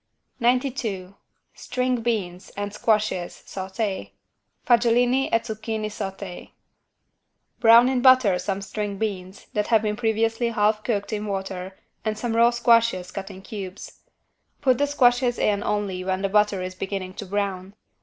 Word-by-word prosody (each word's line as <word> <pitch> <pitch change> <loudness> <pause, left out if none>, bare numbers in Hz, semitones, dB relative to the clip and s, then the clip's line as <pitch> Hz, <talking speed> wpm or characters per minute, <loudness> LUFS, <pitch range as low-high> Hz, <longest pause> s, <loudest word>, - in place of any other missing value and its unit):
92 240 -6 0 0.4
STRING 250 -1 -2
BEANS 195 -6 -2
AND 205 0 -3
SQUASHES 210 -6 0
SAUTÉ 190 - -4 0.6
(Fagiolini 245 +2 +3
e - - +3
zucchini 220 -1 -4
sauté) 195 -3 -6 1.1
Brown 235 +1 +7
in 260 -1 +1
butter 255 -8 +5
some 195 +1 -3
string 205 0 -4
beans, 195 -2 -4
that 210 0 0
have 225 -2 +3
been 210 -1 0
previously 225 +1 0
half 215 -1 +1
cooked 210 -1 -2
in 210 0 -3
water 190 -1 -4 0.3
and 215 -1 -2
some 225 +1 -2
raw 235 +1 +6
squashes 230 -6 +2
cut 195 0 -6
in 190 -1 -11
cubes. 195 -2 -8 0.6
Put 255 -4 +2
the 285 - +2
squashes 245 -3 +3
in 205 -1 +1
only 200 -3 -2
when 190 +1 -2
the 195 - +1
butter 210 -2 +2
is 185 0 -5
beginning 190 0 -5
to 205 - -7
brown. 195 -1 -3
210 Hz, 145 wpm, -24 LUFS, 195-235 Hz, 1.1 s, Brown